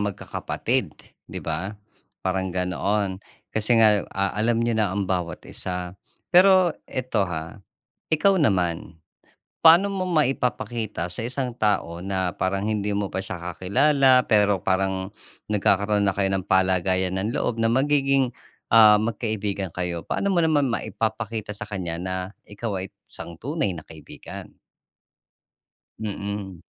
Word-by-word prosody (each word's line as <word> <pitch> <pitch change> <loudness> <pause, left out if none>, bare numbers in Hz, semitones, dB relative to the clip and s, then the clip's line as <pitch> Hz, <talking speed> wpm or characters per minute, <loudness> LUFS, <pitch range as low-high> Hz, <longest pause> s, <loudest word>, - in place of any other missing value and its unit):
magkakapatid 100 -2 -2 0.3
di - - -6
ba, 85 +6 -3 0.5
parang 95 0 0
ganoon. 95 +2 -1 0.3
Kasi 110 +2 +2
nga 105 -2 +5
ah, 100 -1 0
alam 115 +2 +1
ninyo 115 -1 +1
na 105 -2 +2
ang 100 -1 0
bawat 90 -3 -3
isa. 90 -1 -5 0.4
Pero 185 -1 +6 0.2
ito 125 -6 -1
ha, 80 +4 -6 0.5
ikaw 190 +5 +4
naman, 90 - 0 0.6
paano 170 +5 +8
mo 190 -1 -1
maipapakita 120 - -1
sa 90 - -4
isang 125 +1 -3
tao 100 -7 0
na 95 -2 -1
parang 95 0 -1
hindi 105 -1 -1
mo 100 -1 -1
pa 95 - -1
siya 95 - -6 0.2
kakilala, 130 - +4
pero 105 -3 +3
parang 95 0 0 0.4
nagkakaroon 100 0 +2
na 95 - +1
kayo 95 -1 +1
ng 95 0 -2
palagayan 95 0 +2
ng 105 +5 -2
loob 115 -1 -1
na 115 - +3
magiging 135 0 +2 0.4
ah, 110 -2 +9
magkaibigan 105 -3 -2
kayo. 90 -2 -3
Paano 200 -1 0
mo 175 - +3
naman 155 -3 +3
maipapakita 110 -2 -3
sa 110 +1 -6
kanya 90 -5 -3
na 95 0 -3 0.3
ikaw 105 -1 -4
ay 95 - -6 0.2
isang 85 -1 -9
tunay 145 - -2
na 80 - -8
kaibigan? 80 -3 -11 1.5
Mm. 100 -3 -5
105 Hz, 135 wpm, -24 LUFS, 95-120 Hz, 1.5 s, ah